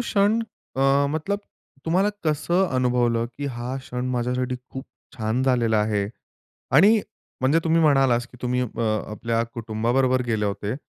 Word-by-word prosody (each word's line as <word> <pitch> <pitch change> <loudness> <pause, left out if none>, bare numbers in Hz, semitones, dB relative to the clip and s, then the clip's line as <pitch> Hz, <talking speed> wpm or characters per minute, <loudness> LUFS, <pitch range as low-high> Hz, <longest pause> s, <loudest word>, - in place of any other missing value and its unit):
क्षण 215 -1 +2 0.4
अ, 135 +1 +3
मतलब 195 +7 -2 0.4
तुम्हाला 185 +5 +2 0.2
कसं 170 +5 +2
अनुभवलं, 120 -2 +1
की 140 +4 -7
हा 125 0 -4
क्षण 125 -1 -5
माझ्यासाठी 125 +1 -1
खूप 130 +1 -7 0.3
छान 110 +3 -1
झालेला 120 -4 +2
आहे? 105 -2 0 0.6
आणि 205 +10 +6 0.4
म्हणजे 140 +5 +3
तुम्ही 165 0 +3
म्हणालात, 135 -5 +4
की 125 - -14
तुम्ही 125 0 0
अ, 115 -1 -5 0.3
आपल्या 115 +1 -1
कुटुंबाबरोबर 120 +3 +1
गेले 110 -2 0
होते, 100 +3 -3
125 Hz, 140 wpm, -24 LUFS, 115-145 Hz, 0.6 s, आणि